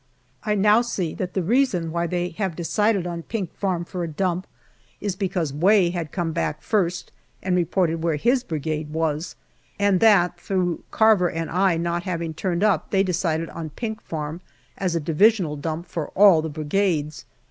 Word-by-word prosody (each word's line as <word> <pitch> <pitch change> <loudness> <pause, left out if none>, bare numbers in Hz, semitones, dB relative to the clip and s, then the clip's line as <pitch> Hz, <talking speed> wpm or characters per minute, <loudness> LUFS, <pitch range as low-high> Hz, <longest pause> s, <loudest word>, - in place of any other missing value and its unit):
I 210 -1 0
now 210 +3 +5
see 190 -9 -2
that 180 -1 -5
the 190 - +1
reason 200 -6 +1
why 170 +1 -1
they 175 +1 -1
have 180 0 -3
decided 200 +3 +1
on 170 -1 -4
Pink 190 -1 -4
Farm 180 -4 -2
for 180 0 -4
a - - -2
dump 180 +3 -2 0.5
is 200 -3 -2
because 180 -6 -2
Way 180 +3 +4
had 170 -4 -4
come 170 -3 -2
back 150 -1 -2
first 185 -4 -1 0.3
and 185 -1 +1
reported 170 -1 +1
where 165 -2 +1
his 245 - +2
Brigade 155 - -3
was, 160 0 -2 0.4
and 200 -2 +3
that 180 -5 +4
through 180 -2 -1
Carver 215 -5 +4
and 165 0 -4
I 185 0 +2
not 170 +1 -1
having 170 -3 -3
turned 175 +3 -1
up 195 -7 +2
they 195 -1 +3
decided 165 -3 -1
on 165 -2 -6
Pink 220 +6 -5
Farm 155 +1 -5 0.3
as 185 -3 -1
a - - +1
Divisional 170 +1 +3
dump 160 +3 -4
for 165 -4 -4
all 195 -5 +7
the 160 - -4
Brigades. 155 -1 -1
175 Hz, 180 wpm, -23 LUFS, 165-195 Hz, 0.5 s, all